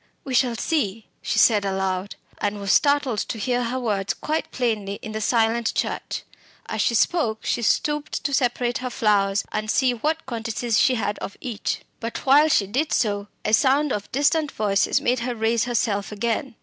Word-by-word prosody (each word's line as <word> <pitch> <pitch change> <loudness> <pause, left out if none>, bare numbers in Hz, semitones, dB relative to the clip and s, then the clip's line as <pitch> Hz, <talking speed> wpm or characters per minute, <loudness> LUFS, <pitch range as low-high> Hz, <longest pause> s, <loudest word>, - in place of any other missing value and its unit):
We 270 - -5
shall 245 -1 +2
see!" 225 - -2
she - - -2
said 210 -3 +5
aloud, 190 0 -2 0.2
and 205 0 -1
was 200 -1 +1
startled 285 -6 +3
to 225 - -3
hear 245 +3 0
her 250 +3 -2
words 205 -5 -1
quite 310 +1 -2
plainly 215 -5 -1
in 215 - -6
the 215 0 -4
silent 230 +1 +1
church. - - -2 0.4
As - - -2
she 235 - +2
spoke 225 -6 +1
she - - 0
stooped 295 +6 0
to 280 0 -1
separate 245 -2 +1
her 255 0 -3
flowers 200 -4 +1
and 215 0 -3
see 255 +2 +3
what 310 +7 -2
quantities 230 -1 -1
she 260 - +4
had 210 -3 -2
of 200 - -7
each. 230 -5 -3 0.2
But 230 0 -5
while 285 +3 +6
she 220 -9 +3
did 265 +10 -1
so 205 -2 0 0.2
a - - 0
sound 275 +4 +3
of 205 -1 -5
distant 290 +2 +2
voices 200 -2 +1
made 245 +1 +1
her 245 0 -3
raise 225 0 +1
herself 220 -5 -1
again. 230 +4 -2
230 Hz, 185 wpm, -23 LUFS, 210-260 Hz, 0.4 s, while